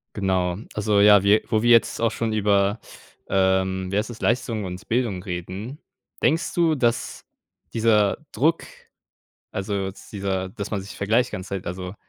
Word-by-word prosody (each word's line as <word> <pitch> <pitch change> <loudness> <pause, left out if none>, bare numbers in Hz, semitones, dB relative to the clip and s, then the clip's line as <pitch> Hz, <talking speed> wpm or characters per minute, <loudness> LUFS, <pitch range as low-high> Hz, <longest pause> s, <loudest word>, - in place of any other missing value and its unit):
Genau. 95 -3 0 0.2
Also, 105 -1 +1
ja, 100 -1 +7
wir 100 +2 +5
wo 110 - +2
wir 120 - +2
jetzt 115 -1 +4
auch 115 -1 +2
schon 115 0 -2
über, 100 0 +2 0.5
ähm, 95 -1 +1
wie 100 - 0
heißt 105 +3 -1
es, 115 -2 -9
Leistung 115 -2 0
und 90 +3 -7
Bildung 115 -6 0
reden, 95 - -6 0.4
denkst 160 +3 +1
du, 165 -2 +2
dass 120 -4 -1 0.5
dieser 110 -3 +3
Druck, 160 +8 +1 0.9
also, 100 0 -2
jetzt 95 - -10
dieser 95 -2 -2
dass 100 +1 -6
man 105 - -2
sich 100 +2 -10
vergleicht 110 +5 +1
die - - -23
ganze 95 0 -6
Zeit, 95 -2 -4
also, 90 +1 -5
100 Hz, 170 wpm, -23 LUFS, 95-115 Hz, 0.9 s, ja